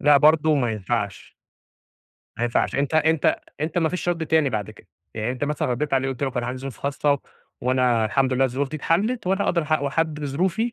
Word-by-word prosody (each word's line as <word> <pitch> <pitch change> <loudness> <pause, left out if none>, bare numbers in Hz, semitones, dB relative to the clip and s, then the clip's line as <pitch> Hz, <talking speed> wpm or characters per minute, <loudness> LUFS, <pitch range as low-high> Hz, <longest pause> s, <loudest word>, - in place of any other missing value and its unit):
لأ، 145 0 +6
برضه 155 +2 +5
ما 125 -5 +1
ينفعش. 100 -1 -3 1.0
ما 120 - -1
ينفعش 120 - 0
أنت 140 +2 0
أنت 160 -1 +3 0.2
أنت 160 +3 -1
ما 160 - +2
فيش 180 +1 -3
رد 165 -2 -1
تاني 155 -3 +3
بعد 110 -2 -3
كده، 110 - -17 0.3
يعني 110 +2 -2
أنت 130 +2 -3
مثلًا 150 -2 -1
رديت 135 +4 -1
على 135 0 +1
قُلت 135 0 -5
له 135 - +1
كان 125 -1 -2
عندي 125 +2 -4
ظروف 135 -1 -7
خاصة، 140 0 0 0.4
وأنا 125 -3 +2
الحمد 130 +4 +1
لله 130 +1 +3
الظروف 135 +2 -1
دي 155 - -5
اتحلت، 200 - 0
وأنا 195 +2 +1
أدرى 170 -2 +1
حد 155 -1 +1
و 140 - 0
حد 155 -1 -1
بظروفي، 185 - -1
140 Hz, 215 wpm, -23 LUFS, 125-160 Hz, 1.0 s, لأ